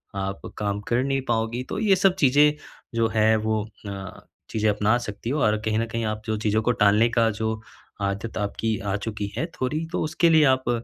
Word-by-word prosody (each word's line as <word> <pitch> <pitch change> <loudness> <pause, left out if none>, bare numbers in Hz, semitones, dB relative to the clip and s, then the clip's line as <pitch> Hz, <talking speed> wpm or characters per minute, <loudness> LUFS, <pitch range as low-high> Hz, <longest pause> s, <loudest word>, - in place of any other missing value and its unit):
आप 95 0 -3 0.2
काम 100 -1 -1
कर 120 +2 +2
नहीं 135 0 0
पाओगी। 115 +2 0
तो - - -3
ये 205 -3 +4
सब 185 0 +3
चीज़ें 145 -2 +5 0.4
जो 115 -1 +3
है 110 0 +4
वो 110 0 0 0.2
अ, 95 -1 -8 0.2
चीज़ें 110 -1 +1
अपना 105 +3 +2
सकती 105 -1 -6
हो 150 - 0
और 110 0 +3
कहीं 110 0 +1
न 115 - 0
कहीं 115 0 -2
आप 110 0 -3
जो 110 -1 -1
चीज़ों 110 +1 +1
को 120 - +3
टालने 105 +3 +5
का 115 -1 +2
जो 110 0 -1 0.4
आदत 100 +3 -3
आपकी 110 +1 -1
आ 100 0 -2
चुकी 105 -1 -4
है, 155 - 0
थोड़ी 155 +1 -3
तो - - 0
उसके 165 +2 +2
लिए 160 -1 +6
आप 130 -2 +2
110 Hz, 210 wpm, -24 LUFS, 105-130 Hz, 0.4 s, लिए